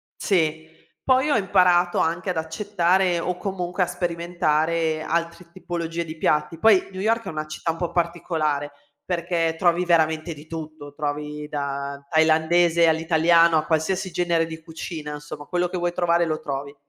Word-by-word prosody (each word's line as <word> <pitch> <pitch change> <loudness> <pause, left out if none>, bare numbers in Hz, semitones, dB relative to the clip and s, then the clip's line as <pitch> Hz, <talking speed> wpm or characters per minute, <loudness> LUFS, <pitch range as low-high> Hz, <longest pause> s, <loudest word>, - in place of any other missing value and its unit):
Sì. 160 -5 0 0.4
Poi 260 +3 +3
ho - - +4
imparato 180 -3 +3
anche 170 +4 0
ad 180 - -1
accettare, 180 +2 +1
o 180 +1 -2
comunque 180 -1 -3
a 180 - +3
sperimentare, 170 -2 0
altre 170 +2 -3
tipologie 170 -2 -4
di 160 0 -8
piatti. 155 +1 0
Poi 210 -1 +4
New 190 0 -6
York 230 +2 +1
è - - -4
una 155 -1 -4
città 155 +2 -3
un 165 - -8
po' 170 0 -3
particolare 160 -4 -1 0.3
perché 170 -2 -1
trovi 175 +1 +2
veramente 160 -1 +1
di 150 +1 -13
tutto, 155 -3 -8
trovi 150 0 -4
da 140 -1 -4
thailandese 160 +1 +4
all'italiano, 165 +1 +4
a 155 - 0
qualsiasi 180 +4 0
genere 170 -2 +1
di 160 0 -8
cucina, 160 -2 -7
insomma, 145 0 -9
quello 180 +3 0
che 180 - -5
vuoi 175 0 -1
trovare 170 -1 +2
lo 155 -1 -2
trovi. 140 0 -5
165 Hz, 160 wpm, -23 LUFS, 155-175 Hz, 0.4 s, ho